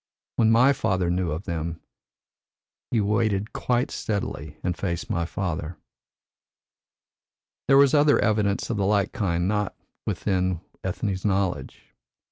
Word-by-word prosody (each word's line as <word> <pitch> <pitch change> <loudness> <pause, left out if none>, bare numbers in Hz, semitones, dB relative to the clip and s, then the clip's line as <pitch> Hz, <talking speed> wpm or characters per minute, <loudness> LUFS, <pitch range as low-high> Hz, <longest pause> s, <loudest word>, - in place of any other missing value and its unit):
When 110 -2 +4
my 125 +5 +6
father 95 -9 0
knew 90 -1 0
of 80 +4 -3
them, 85 -2 -4 1.1
he 115 - +1
waited 105 0 0
quite 125 0 0
steadily 80 -8 -3
and 90 -1 0
faced 90 +1 -3
my 85 -5 0
father." 85 -1 -3 1.9
There 135 - +6
was 140 -1 +6
other 145 -1 +5
evidence 105 -1 +1
of 115 - -1
the 100 - +1
like 100 -1 +2
kind 85 -3 0
not 105 -1 -1 0.3
within 95 -3 0 0.2
Ethne's 95 0 -2
knowledge. 95 -9 -2
100 Hz, 125 wpm, -25 LUFS, 85-110 Hz, 1.9 s, my